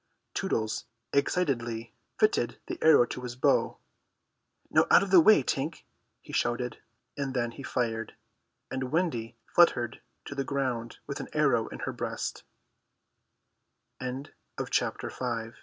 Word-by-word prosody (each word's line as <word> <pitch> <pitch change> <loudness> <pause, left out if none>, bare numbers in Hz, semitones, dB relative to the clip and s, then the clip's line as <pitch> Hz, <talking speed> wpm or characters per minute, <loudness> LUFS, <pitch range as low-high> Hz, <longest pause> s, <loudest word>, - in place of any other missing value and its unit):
Tootles 110 - -1 0.3
excitedly 120 -7 0 0.2
fitted 120 - +2
the - - -6
arrow 160 -6 +7
to 125 - -6
his 125 -1 -5
bow. 125 - +2 1.1
"Out - - +7
of 195 - -4
the 185 - +9
way, 210 -5 +7
Tink," 145 +6 -2 0.4
he - - -11
shouted, 120 0 0 0.4
and 135 -2 -3
then 120 -2 0
he 140 - -10
fired, 115 -4 -2 0.6
and 130 -1 -2
Wendy 135 -9 0
fluttered 120 -9 +3 0.2
to - - -6
the 140 -1 -1
ground 130 -4 -2
with - - -5
an - - -6
arrow - - +3 2.3
i 125 -2 -3
125 Hz, 110 wpm, -29 LUFS, 120-140 Hz, 2.3 s, the